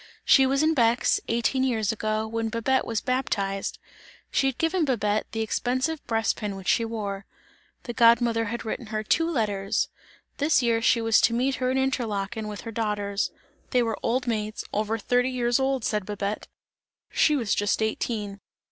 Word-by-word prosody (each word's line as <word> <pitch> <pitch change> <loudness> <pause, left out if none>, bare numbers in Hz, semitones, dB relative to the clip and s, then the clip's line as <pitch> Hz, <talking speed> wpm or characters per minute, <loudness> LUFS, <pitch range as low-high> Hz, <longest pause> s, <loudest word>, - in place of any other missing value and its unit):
She 270 -1 +6
was 275 +3 +2
in 315 +1 +3
Bex, 235 -3 +2
eighteen 235 +3 +1
years 225 -5 +1
ago, 215 0 -1
when 225 0 -2
Babette 240 +4 0
was 225 -2 -1
baptized; 200 -7 -1 0.5
she 270 - +2
had 265 - -2
given 330 +2 +1
Babette, 215 -6 0
the 225 - -2
expensive 255 +7 -1
breastpin 225 -2 -1
which 190 -1 -9
she 230 - +3
wore. 205 -3 -4 0.6
The 240 - -5
god 235 0 +6
mother 230 -2 0
had 235 +3 -4
written 225 +1 -4
her 215 0 -3
two 330 +9 +2
letters; 205 -9 0 0.5
this 290 -2 +3
year 230 -1 +2
she 235 0 +3
was 225 -1 +4
to 230 - +3
meet 260 +3 +1
her 255 - +1
in 260 - +1
Interlaken, 220 -5 -1
with 210 -1 -6
her 230 - -7
daughters; 210 -2 -1 0.4
they 250 -2 +3
were 225 -2 -2
old 250 +2 0
maids, 215 -2 -2
over 215 +2 0
thirty 245 +3 +1
years 245 -1 +1
old, 265 -3 0
said 210 -2 0
Babette; 205 0 -3 0.6
she 300 - +3
was 235 -7 0
just 205 0 +1
eighteen. 210 -2 -2
230 Hz, 175 wpm, -26 LUFS, 215-255 Hz, 0.6 s, She